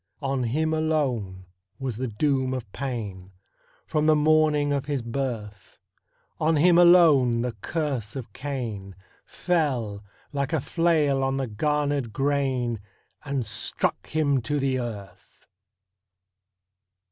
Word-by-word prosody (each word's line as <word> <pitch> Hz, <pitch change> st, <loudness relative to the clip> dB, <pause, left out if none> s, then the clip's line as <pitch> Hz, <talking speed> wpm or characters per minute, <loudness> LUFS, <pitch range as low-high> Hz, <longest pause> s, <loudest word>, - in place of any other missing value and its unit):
On 135 Hz, -2 st, 0 dB
him 155 Hz, +7 st, 0 dB
alone 130 Hz, -13 st, -1 dB, 0.3 s
was 130 Hz, -5 st, -4 dB
the 130 Hz, +1 st, -2 dB
doom 130 Hz, +3 st, 0 dB
of 115 Hz, -6 st, -7 dB
pain, 105 Hz, -8 st, -5 dB, 0.5 s
From 155 Hz, 0 st, 0 dB
the 155 Hz, -, +6 dB
morning 150 Hz, -1 st, +3 dB
of 140 Hz, -1 st, -1 dB
his 140 Hz, -4 st, -2 dB
birth; 115 Hz, -5 st, -5 dB, 0.6 s
On 160 Hz, +1 st, +2 dB
him 170 Hz, +3 st, +5 dB
alone 150 Hz, -10 st, +6 dB
the 125 Hz, -, -1 dB
curse 125 Hz, -, -3 dB
of 120 Hz, -6 st, -7 dB
Cain 115 Hz, -9 st, -5 dB, 0.3 s
Fell, 125 Hz, -, -1 dB, 0.3 s
like 140 Hz, +2 st, -2 dB
a 160 Hz, -, +2 dB
flail 150 Hz, -2 st, +1 dB
on 135 Hz, 0 st, 0 dB
the 135 Hz, -, -1 dB
garnered 145 Hz, +2 st, -1 dB
grain, 135 Hz, -3 st, 0 dB, 0.5 s
And 135 Hz, -4 st, -2 dB
struck 110 Hz, +3 st, -1 dB
him 145 Hz, -4 st, +1 dB
to 145 Hz, +6 st, -1 dB
the 135 Hz, -1 st, 0 dB
earth! 100 Hz, -6 st, -8 dB
135 Hz, 125 wpm, -25 LUFS, 115-150 Hz, 0.6 s, the